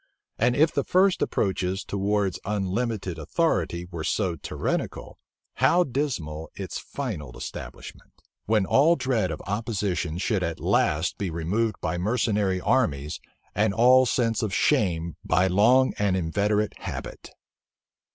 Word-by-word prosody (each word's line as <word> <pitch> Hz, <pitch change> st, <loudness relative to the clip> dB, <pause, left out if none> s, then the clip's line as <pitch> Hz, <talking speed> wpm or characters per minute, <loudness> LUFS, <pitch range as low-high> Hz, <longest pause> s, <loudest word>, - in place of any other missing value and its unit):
And 125 Hz, -, +3 dB
if 155 Hz, +3 st, +4 dB
the 140 Hz, -, 0 dB
first 185 Hz, +4 st, +3 dB
approaches 95 Hz, -1 st, -1 dB
towards 100 Hz, -1 st, -1 dB
unlimited 100 Hz, -2 st, -2 dB
authority 85 Hz, +2 st, 0 dB
were 85 Hz, -2 st, -5 dB
so 95 Hz, 0 st, 0 dB
tyrannical, 80 Hz, -, -4 dB, 0.4 s
how 180 Hz, +1 st, +4 dB
dismal 115 Hz, -, -3 dB
its -, -, -5 dB
final 110 Hz, -, -6 dB
establishment; -, -, -9 dB, 0.3 s
when 105 Hz, -2 st, +2 dB
all 150 Hz, -, +4 dB
dread 120 Hz, -, 0 dB
of 75 Hz, -, -6 dB
opposition 100 Hz, -6 st, -2 dB
should 100 Hz, +1 st, 0 dB
at 85 Hz, -2 st, -3 dB
last 80 Hz, +5 st, +1 dB
be 100 Hz, -, -1 dB
removed 95 Hz, +7 st, -1 dB
by 85 Hz, 0 st, -2 dB
mercenary 105 Hz, -2 st, +1 dB
armies, 85 Hz, -, 0 dB, 0.3 s
and 105 Hz, 0 st, +1 dB
all 125 Hz, +2 st, +6 dB
sense 115 Hz, -2 st, +1 dB
of 105 Hz, -4 st, -2 dB
shame 85 Hz, -5 st, +1 dB
by 90 Hz, +3 st, +2 dB
long 115 Hz, +8 st, +4 dB
and 100 Hz, -2 st, +2 dB
inveterate 105 Hz, +5 st, 0 dB
habit! -, -, -7 dB
100 Hz, 130 wpm, -25 LUFS, 90-115 Hz, 0.4 s, all